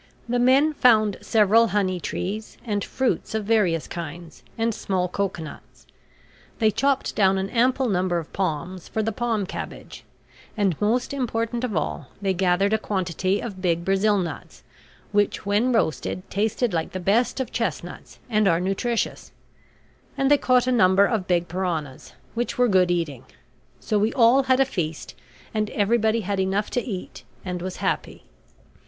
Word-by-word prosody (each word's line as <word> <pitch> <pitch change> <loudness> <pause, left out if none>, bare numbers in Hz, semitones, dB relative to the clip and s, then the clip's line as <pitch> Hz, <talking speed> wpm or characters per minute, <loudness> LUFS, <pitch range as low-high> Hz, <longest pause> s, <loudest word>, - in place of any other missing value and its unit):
The 245 +1 0
men 270 +5 +4
found 215 -7 +4
several 225 +1 +4
honey 190 -4 0
trees, 205 +5 -4
and 205 -3 -1
fruits 260 -3 -1
of 215 -2 -2
various 195 -8 +2
kinds, 170 0 -8 0.2
and 225 0 +1
small 185 -3 -1
cocoanuts; 180 -4 -5 0.7
they 220 -2 +3
chopped 275 +4 0
down 195 -2 +3
an 190 +1 -3
ample 255 +2 +2
number 180 -3 +1
of 165 -2 -6
palms, 180 0 -3
for 220 - -2
the 225 - 0
palm 225 -4 -1
cabbage; - - -8 0.5
and, 195 -5 +2
most 235 +6 +1
important 235 -2 -2
of 230 -6 -2
all, 150 -2 -3
they 195 -1 0
gathered 185 +2 +2
a 220 - +2
quantity 185 -1 -1
of 195 -6 -6
big 170 -2 0
Brazil 200 +2 +2
nuts, 175 -4 -5 0.5
which 205 -1 +1
when 210 +5 +2
roasted 185 -4 -1
tasted 220 +2 0
like 165 -1 -2
the 185 - -3
best 215 +9 +1
of 260 - -3
chestnuts 175 - -4
and 215 -4 +2
are 165 -2 +3
nutritious; 195 +6 -2 0.9
and 270 +1 +2
they 290 - +7
caught 250 -1 +3
a 255 - +1
number 200 -4 +5
of 200 -3 -1
big 175 -1 +1
piranhas, 170 -8 -4 0.2
which 240 +1 -2
were 245 0 +4
good 185 -4 +3
eating. 160 -8 -2 0.6
So 210 - 0
we 215 +2 +2
all 245 +2 +5
had 260 0 +3
a 270 - +5
feast, 165 - -4 0.4
and 215 -1 0
everybody 220 +1 +1
had 200 0 -2
enough 190 +2 0
to 245 - 0
eat 195 -7 -7 0.2
and 180 -1 -4
was 185 +1 -5
happy. - - -2
205 Hz, 160 wpm, -24 LUFS, 180-230 Hz, 0.9 s, they